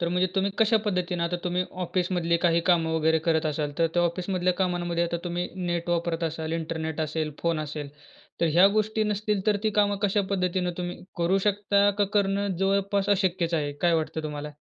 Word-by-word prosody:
तर 170 Hz, -, 0 dB
म्हणजे 180 Hz, +1 st, +2 dB
तुम्ही 195 Hz, 0 st, +1 dB
कशा 225 Hz, 0 st, +4 dB
पद्धतीने, 180 Hz, -3 st, -1 dB
आता 170 Hz, +1 st, 0 dB
तुम्ही 180 Hz, +1 st, 0 dB, 0.2 s
ऑफिसमधली 175 Hz, -1 st, 0 dB
काही 170 Hz, -1 st, +4 dB
कामं 165 Hz, -2 st, +2 dB
वगैरे 160 Hz, 0 st, +3 dB
करत 160 Hz, -1 st, +2 dB
असाल, 150 Hz, -1 st, -2 dB
तर 165 Hz, -, +4 dB
त्या 175 Hz, -, +3 dB
ऑफिसमधल्या 180 Hz, +1 st, 0 dB
कामांमध्ये 175 Hz, -2 st, 0 dB
आता 170 Hz, 0 st, -2 dB
तुम्ही 175 Hz, 0 st, -2 dB, 0.2 s
नेट 175 Hz, 0 st, -2 dB
वापरत 170 Hz, -1 st, -1 dB
असाल, 160 Hz, 0 st, -3 dB
इंटरनेट 160 Hz, -1 st, -3 dB
असेल, 155 Hz, 0 st, -2 dB
फोन 170 Hz, -2 st, +1 dB
असेल, 150 Hz, -1 st, -5 dB, 0.5 s
तर 170 Hz, -, +3 dB
ह्या 175 Hz, +4 st, +7 dB
गोष्टी 215 Hz, +1 st, +1 dB
नसतील, 210 Hz, -1 st, -1 dB
तर 210 Hz, -1 st, +4 dB
ती 215 Hz, -, +1 dB
कामं 205 Hz, 0 st, +2 dB
कशा 205 Hz, 0 st, +2 dB
पद्धतीने 180 Hz, -2 st, 0 dB
तुम्ही 175 Hz, 0 st, -3 dB, 0.2 s
करू 175 Hz, +3 st, +2 dB
शकता, 200 Hz, 0 st, +3 dB
का 205 Hz, -, +4 dB
करणं 200 Hz, -1 st, 0 dB
जवळपास 195 Hz, +1 st, +1 dB
अशक्यच 185 Hz, -4 st, +1 dB
आहे? 145 Hz, -3 st, -1 dB
काय 170 Hz, +4 st, +1 dB
वाटतं 160 Hz, 0 st, -2 dB
तुम्हाला? 150 Hz, -1 st, -5 dB
175 Hz, 190 wpm, -26 LUFS, 165-195 Hz, 0.5 s, ह्या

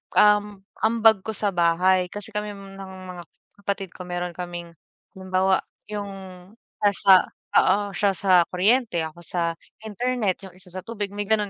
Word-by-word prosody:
um, 210 Hz, -1 st, +4 dB, 0.2 s
ambag 225 Hz, -1 st, +4 dB
ko 220 Hz, -, -3 dB
sa 205 Hz, -1 st, 0 dB
bahay. 180 Hz, +1 st, +3 dB
Kasi 205 Hz, +4 st, -4 dB
kami 210 Hz, 0 st, -4 dB
ng 195 Hz, -1 st, -10 dB, 0.3 s
mga 175 Hz, -, -8 dB, 0.4 s
kapatid 200 Hz, -1 st, -3 dB
ko 180 Hz, -, -10 dB
meron 175 Hz, 0 st, -3 dB
kaming, 175 Hz, -1 st, -7 dB, 0.5 s
halimbawa, 190 Hz, 0 st, +2 dB, 0.3 s
'yong 195 Hz, -2 st, -7 dB, 0.3 s
pasa 195 Hz, -2 st, +5 dB, 0.3 s
oo, 205 Hz, 0 st, +3 dB
siya 200 Hz, +2 st, +2 dB
sa 180 Hz, -2 st, +4 dB
kuryente, 215 Hz, 0 st, +2 dB
ako 160 Hz, +1 st, -7 dB
sa 170 Hz, -1 st, 0 dB, 0.3 s
internet, 220 Hz, -3 st, -1 dB
yung 190 Hz, -, -12 dB
isa 180 Hz, 0 st, -11 dB
sa 185 Hz, +1 st, -7 dB
tubig 210 Hz, -3 st, -4 dB
may 205 Hz, +1 st, -4 dB
ganun 210 Hz, -1 st, +1 dB
195 Hz, 150 wpm, -24 LUFS, 180-210 Hz, 0.5 s, pasa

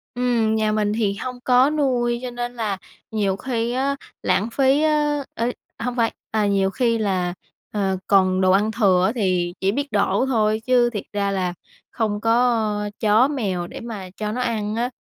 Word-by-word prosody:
Ừm, 240 Hz, -3 st, +1 dB
nhà 215 Hz, -1 st, +1 dB
mình 210 Hz, -1 st, +1 dB
thì 210 Hz, -3 st, +1 dB
hông 250 Hz, +3 st, -6 dB
có 255 Hz, +2 st, +5 dB
nuôi 250 Hz, -5 st, +1 dB
cho 250 Hz, -, -4 dB
nên 240 Hz, 0 st, -4 dB
là 215 Hz, -4 st, -2 dB, 0.3 s
nhiều 205 Hz, -3 st, 0 dB
khi 235 Hz, +1 st, -2 dB
á 275 Hz, +2 st, 0 dB, 0.3 s
lãng 190 Hz, +5 st, +1 dB
phí 270 Hz, +4 st, +3 dB
á 295 Hz, -2 st, +1 dB
ê, 235 Hz, +2 st, -1 dB, 0.3 s
hông 245 Hz, +1 st, -3 dB
phải, 230 Hz, -2 st, +1 dB, 0.2 s
à, 215 Hz, -2 st, +1 dB
nhiều 195 Hz, -1 st, +2 dB
khi 230 Hz, +2 st, +1 dB
là, 185 Hz, -5 st, 0 dB, 0.4 s
ờ, 195 Hz, -2 st, 0 dB
còn 185 Hz, -2 st, +3 dB
đồ 185 Hz, 0 st, +4 dB
ăn 205 Hz, +3 st, +3 dB
thừa 195 Hz, -5 st, +3 dB
á 195 Hz, -, +2 dB
thì 180 Hz, -5 st, 0 dB
chỉ 195 Hz, +1 st, +1 dB
biết 280 Hz, +5 st, -3 dB
đổ 200 Hz, +3 st, +2 dB
thôi 215 Hz, -4 st, +2 dB
chứ 245 Hz, -2 st, +4 dB
thiệt 210 Hz, -4 st, -4 dB
ra 200 Hz, -1 st, 0 dB
là 185 Hz, -2 st, -1 dB, 0.4 s
không 215 Hz, -3 st, -1 dB
có 225 Hz, -3 st, +1 dB
chó 220 Hz, +3 st, +4 dB
mèo 200 Hz, -11 st, -2 dB
để -, -, -8 dB
mà 210 Hz, -6 st, -7 dB
cho 210 Hz, -1 st, -2 dB
nó 250 Hz, +3 st, -2 dB
ăn 220 Hz, -3 st, -1 dB
á. 240 Hz, +2 st, 0 dB
220 Hz, 190 wpm, -22 LUFS, 200-245 Hz, 0.4 s, có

